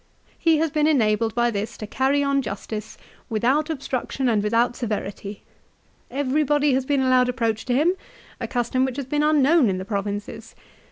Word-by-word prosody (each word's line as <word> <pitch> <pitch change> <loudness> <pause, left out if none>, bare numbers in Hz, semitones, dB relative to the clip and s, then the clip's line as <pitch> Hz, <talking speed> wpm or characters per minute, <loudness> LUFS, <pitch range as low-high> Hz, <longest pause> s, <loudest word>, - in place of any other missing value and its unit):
" - - -34
He 320 - +5
has 320 0 0
been 300 0 +2
enabled 225 -6 +2
by 240 0 +2
this 215 +2 -4
to 215 - -6
carry 270 +6 +1
on 280 0 +1
justice 215 -1 -6 0.3
without 260 +8 +1
obstruction 270 -3 -2
and 220 -4 +2
without 230 +3 +1
severity. 205 -3 -5 0.7
Every 280 +3 0
body 290 0 +2
has 260 0 0
been 280 -2 +2
allowed 255 -1 +3
approach 230 -3 -1
to 245 - 0
him, 320 +7 +3 0.5
a - - -3
custom 245 +1 0
which 260 0 -2
has 280 - -3
been 295 +3 -1
unknown 300 -3 +4
in 185 - -1
the 185 - -5
provinces. 205 0 -5
255 Hz, 180 wpm, -23 LUFS, 220-285 Hz, 0.7 s, He